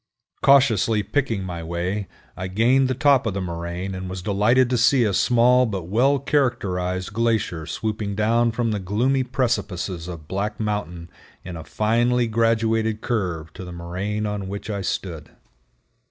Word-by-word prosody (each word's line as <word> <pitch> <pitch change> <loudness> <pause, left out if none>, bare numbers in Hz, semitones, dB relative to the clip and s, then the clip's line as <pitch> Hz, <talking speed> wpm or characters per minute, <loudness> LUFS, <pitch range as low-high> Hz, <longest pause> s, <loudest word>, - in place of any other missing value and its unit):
Cautiously 115 -6 +4
picking 115 -3 -1
my 90 -2 -5
way, 90 +4 -3 0.3
I 95 - -4
gained 120 +8 +3
the 130 - -1
top 140 -2 +3
of 100 - -2
the - - -1
moraine 85 +1 -4
and 95 0 -5
was 90 -1 -6
delighted 110 +6 +3
to 125 - +2
see 125 +2 +4
a 105 -3 +1
small 125 +3 +4
but 95 -5 -3
well 130 +7 +3
characterized 100 -10 -1
glacier 110 -8 0
swooping 105 -2 -3
down 115 +3 +2
from 115 0 -1
the 105 - -1
gloomy 120 +8 +1
precipices 105 -9 -2
of 85 -4 -8
Black 100 +3 -3
Mountain 90 -6 -3 0.3
in 90 -1 -7
a 80 - -7
finely 120 +6 +1
graduated 115 -1 +1
curve 90 -9 -2
to - - -8
the 90 - -8
moraine 95 +5 -3
on 105 -2 -3
which 100 +2 -5
I 100 -1 -3
stood. 85 -5 -4
105 Hz, 160 wpm, -23 LUFS, 90-120 Hz, 0.3 s, Cautiously